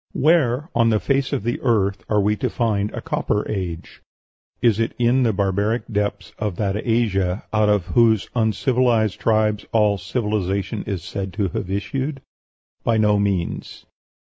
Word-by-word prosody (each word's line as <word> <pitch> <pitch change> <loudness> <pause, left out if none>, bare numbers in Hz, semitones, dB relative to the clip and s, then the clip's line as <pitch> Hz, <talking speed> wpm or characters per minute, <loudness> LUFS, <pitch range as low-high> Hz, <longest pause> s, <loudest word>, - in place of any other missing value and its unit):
Where 150 -1 +2
on 115 -1 +3
the 110 -1 +2
face 135 +2 0
of 140 -7 -1
the 120 +2 -1
earth 100 -6 +1
are 105 - +3
we 105 +1 +2
to - - -1
find 105 -4 0
a - - -6
Copper 105 - -1
Age? 90 -5 -5 0.6
Is 115 -3 +3
it 115 - -1
in 120 +2 +3
the 120 -3 +3
barbaric 100 +4 0
depths 100 -1 -2
of 105 -4 -2
that 100 +1 -1
Asia 105 -5 0
out 110 -1 +3
of 105 -4 +2
whose 115 -2 +3
uncivilized 115 -1 +1
tribes 110 -2 +1
all 105 -3 +3
civilization 105 -3 -2
is 95 -6 -3
said 95 +1 -5
to 100 0 -1
have 90 +3 -4
issued? 135 +8 -3 0.6
By 115 -1 +2
no 105 -1 +3
means. 100 -4 -2
105 Hz, 160 wpm, -21 LUFS, 100-120 Hz, 0.6 s, on